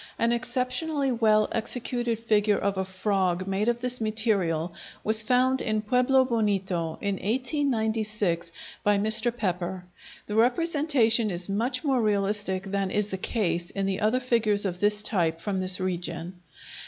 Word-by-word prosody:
An 230 0 +1
exceptionally 255 +4 -1
well 215 -3 +3
executed 240 0 -1
figure 210 -2 +1
of 200 0 -1
a 190 - -1
frog 185 -1 -1
made 195 +3 -1
of 240 0 0
this 250 -1 +1
material 200 -7 0 0.3
was 220 +1 +4
found 255 +3 +2
in 215 -1 -1
Pueblo 250 +4 +3
Bonito, 195 -8 -1
in 200 -2 -1
1896, 220 - -1 0.3
by 205 0 +3
Mr. 220 +3 +2
Pepper. 180 -3 -3 0.4
The 210 - -6
representation 245 -2 +3
is 175 -1 -2
much 225 +9 -1
more 270 -5 +1
realistic 200 -2 0
than 195 -1 -2
is 210 +1 -1
the 190 - -3
case 175 -5 -1
in 195 -1 -3
the 195 -1 -1
other 220 +4 +1
figures 225 -5 +1
of 180 -2 -3
this 210 +1 +2
type 165 -7 0
from 190 +2 -3
this 185 0 +1
region. 175 -1 -4
210 Hz, 150 wpm, -26 LUFS, 190-240 Hz, 0.4 s, was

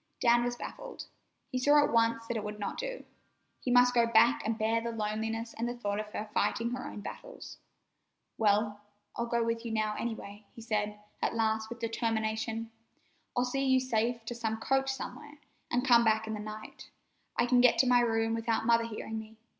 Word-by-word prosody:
Dan 240 -1 +4
was 240 0 -1
baffled. - - -8 0.5
He 255 - -1
saw 290 +3 +5
at 290 - 0
once 230 0 +2
that 235 0 -3
it 215 - -2
would 210 0 -5
not 205 -1 -4
do. - - -5 0.5
He - - -4
must 245 0 +6
go 235 -1 +4
back 230 +1 +5
and 220 0 -1
bear 225 +1 +1
the 235 - -3
loneliness 225 +1 -3
and 235 +1 -2
the 240 - -4
thought 205 -3 -2
of 215 - -4
her 210 0 -5
fighting 220 +3 +1
her 255 0 -4
own 205 - -8
battles. - - -9 0.8
"Well, 210 -1 +2 0.3
I'll 235 - -2
go 235 0 +1
with 230 0 -1
you 230 - -4
now, 215 -1 0
any 235 -1 -2
way," 205 0 -11
he 230 - -9
said 210 -2 -1 0.2
at - - 0
last, 220 -1 0
with 235 - -6
determination. 225 -1 -2 0.7
"I'll 245 - +3
see 270 +2 -1
you 260 0 +5
safe 235 -2 -1
to 240 - -4
some 225 -2 -2
coach 270 +4 +1
somewhere, 290 +3 -7 0.3
an' 245 +1 +1
come 240 -3 +6
back 220 -1 +2
in 220 - -4
the 215 - -4
night. 215 +1 -8 0.5
I - - +4
can 245 0 +4
get 250 - +5
to 260 - +4
my 245 0 +6
room 225 -1 +1
without 225 -1 0
Mother 230 0 +4
hearing 220 0 -5
me. 220 0 -11
230 Hz, 205 wpm, -31 LUFS, 220-240 Hz, 0.8 s, must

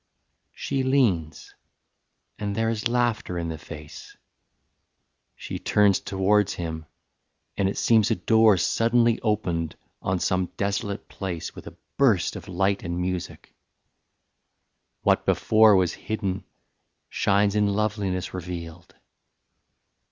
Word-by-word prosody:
III. - - -50
She 135 - -2
leans, 105 - 0 0.9
and 100 -1 -3
there 115 +1 +1
is 110 0 -1
laughter 120 -6 0
in 85 -1 -3
the 80 - -5
face 75 -2 -11 1.2
She - - -6
turns 100 -2 +3
towards 100 +1 +1
him; 80 -2 -5 0.7
and 95 -1 +1
it - - -5
seems 110 -3 +3
a - - +2
door 110 +2 +4
Suddenly 115 +4 +2
opened 90 -7 -1 0.3
on 95 0 0
some 90 +1 0
desolate 100 0 -2
place 90 -5 -5
With - - -11
a - - -11 0.2
burst 110 -10 +3
of - - -8
light 95 +1 0
and 85 +1 -4
music. 90 -1 -4 1.5
What - - +3
before 110 -1 +5
Was 90 -3 +2
hidden 95 -3 -4 0.6
shines 100 0 +2
in 105 -1 +3
loveliness 100 -3 -1
revealed. 85 -1 -7
100 Hz, 120 wpm, -25 LUFS, 90-110 Hz, 1.5 s, before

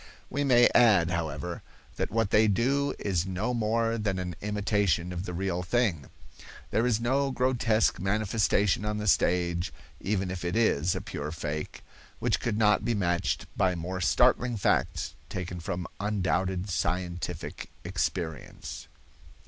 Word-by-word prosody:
We 145 - 0
may 120 -3 +6
add, 100 -8 +5
however, 85 0 -3 0.4
that - - -1
what 115 -1 0
they 110 +1 +5
do 135 +8 +1
is 95 -3 -1
no 95 +7 -1
more 115 0 0
than 100 -3 -1
an 90 -2 -4
imitation 100 -4 0
of 90 +1 -4
the 90 - -4
real 90 -1 -1
thing. 90 - 0 0.6
There 115 +2 +2
is 115 -3 +2
no 135 +4 +1
grotesque 125 -6 +2
manifestation 105 0 +1
on 105 0 -1
the 105 - -3
stage, 90 -2 +2 0.3
even 95 -2 -1
if 95 -2 -5
it 85 0 -2
is 90 -7 +2
a - - -3
pure 75 +1 -5
fake, 75 -1 -5 0.3
which - - 0
could 110 -3 -1
not 105 -1 +3
be 120 - 0
matched 90 -3 0
by 95 -2 +2
more 90 +2 -4
startling 120 +6 +3
facts 100 - 0 0.2
taken 90 -1 -5
from 85 +1 -4
undoubted 95 -2 0
scientific 90 0 -3
experience. 80 -4 -4
95 Hz, 145 wpm, -28 LUFS, 90-110 Hz, 0.6 s, may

